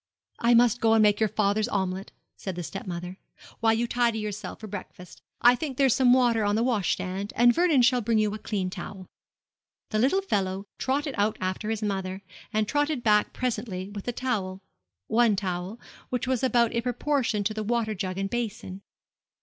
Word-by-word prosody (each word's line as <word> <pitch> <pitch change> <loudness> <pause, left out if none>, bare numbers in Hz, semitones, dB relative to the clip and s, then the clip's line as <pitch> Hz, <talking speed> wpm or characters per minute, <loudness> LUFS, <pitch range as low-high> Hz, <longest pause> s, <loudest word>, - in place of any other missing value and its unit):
'I 235 0 +4
must 240 0 +4
go 225 -1 +4
and 220 - +5
make 210 -1 +4
your 220 -1 +2
father's 210 +2 +1
omelette,' 190 -3 -2 0.2
said 190 -3 -6
the 175 - -4
stepmother, 180 0 -6 0.4
'while 225 -1 +3
you 235 +2 0
tidy 235 -1 +1
yourself 210 -2 -5
for 220 - -8
breakfast. 185 -3 -9 0.2
I 245 - +8
think 265 0 -4
there's 270 -4 +4
some 255 -2 +4
water 240 -3 +4
on 205 0 +1
the 225 - +2
washstand, 200 -4 -1
and 240 +1 +5
Vernon 330 -6 +3
shall 250 0 +4
bring 225 0 +1
you 215 -1 +1
a 215 - -5
clean 190 -3 -2
towel.' 190 0 -7 0.9
The 215 - +1
little 330 - +2
fellow 195 - -1
trotted 280 +2 -1
out 210 +1 +1
after 185 +3 -3
his 220 -1 -2
mother, 190 -1 -3 0.3
and 215 -1 0
trotted 290 -1 0
back 210 -1 +3
presently 210 -6 -3
with 205 -1 -7
the 245 - -1
towel 200 -7 -3 0.4
one 230 -2 +3
towel, 185 +2 -4 0.3
which 250 -1 -1
was 255 -2 0
about 240 -3 +3
in 235 - 0
proportion 245 -3 0
to 215 +2 -1
the 215 - -3
water 220 0 0
jug 185 -2 -4
and 195 0 -2
basin. 220 -5 -4
215 Hz, 190 wpm, -27 LUFS, 195-240 Hz, 0.9 s, I